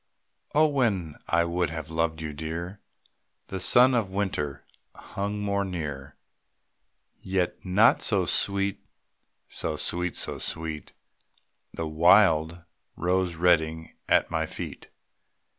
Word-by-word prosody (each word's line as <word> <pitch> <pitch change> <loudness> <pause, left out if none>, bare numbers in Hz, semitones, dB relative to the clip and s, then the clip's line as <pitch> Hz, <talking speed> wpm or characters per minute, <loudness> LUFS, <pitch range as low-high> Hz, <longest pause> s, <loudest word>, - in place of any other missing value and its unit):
Oh, 155 +1 +6
when 110 - 0 0.2
I 85 0 +3
would 85 -1 -1
have 80 -1 -6
loved 80 -1 -1
you, 75 -1 -5
Dear, 85 +6 -5 0.7
The 95 - -4
sun 125 +6 +6
of 115 -5 +1
winter 95 -8 -3 0.3
hung 100 +1 -5
more 100 -1 0
near; 75 -6 -5 1.0
Yet 95 -2 -2
not 100 +5 +4
so 95 -4 +2
sweet, 100 +4 -1 0.6
so - - -3
sweet, 90 0 -2
so - - -4
sweet, 80 -2 -5 0.8
The 80 - -4
wild 85 0 +4 0.3
rose 90 0 0
reddening 80 -2 +1 0.2
at - - +3
my - - -1
feet. - - -8
90 Hz, 115 wpm, -26 LUFS, 80-100 Hz, 1.0 s, Oh